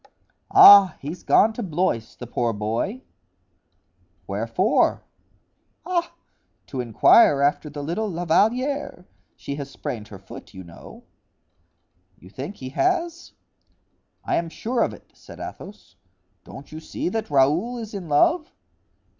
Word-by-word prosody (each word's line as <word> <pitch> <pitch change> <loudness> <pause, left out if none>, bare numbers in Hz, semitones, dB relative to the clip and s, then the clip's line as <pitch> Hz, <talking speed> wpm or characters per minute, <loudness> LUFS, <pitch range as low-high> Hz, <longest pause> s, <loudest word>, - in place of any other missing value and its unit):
"Ah, 200 -4 +8
he's 155 +6 -7
gone 220 - +3
to 240 - -6
Blois; 160 - -2
the 125 - -8
poor 120 -1 -2
boy——" 115 - -3 1.2
"Wherefore?" - - 0 0.8
"Ah, 345 -2 -2 0.5
to 130 - -5
inquire 140 - +4
after 145 +1 0
the 145 0 -7
little 205 +8 -2
La 175 -1 -4
Valliere; 245 - 0 0.3
she 140 - -7
has 140 -1 -6
sprained 110 -5 -6
her 100 - -11
foot, 95 +1 -13
you 95 - -9
know." 85 -1 -14 1.1
"You 90 - -17
think 140 - -7
he 130 -6 -8
has?" 345 - -1 0.9
"I - - 0
am 165 -1 -2
sure 235 +8 -3
of - - +1
it," - - -21
said - - -15
Athos; - - -10 0.5
"don't 140 - -12
you 155 - -8
see 160 - -5
that 220 +3 -4
Raoul 150 - +2
is 220 -2 -8
in 185 -5 -7
love?" 305 - +2
165 Hz, 135 wpm, -23 LUFS, 135-220 Hz, 1.2 s, Ah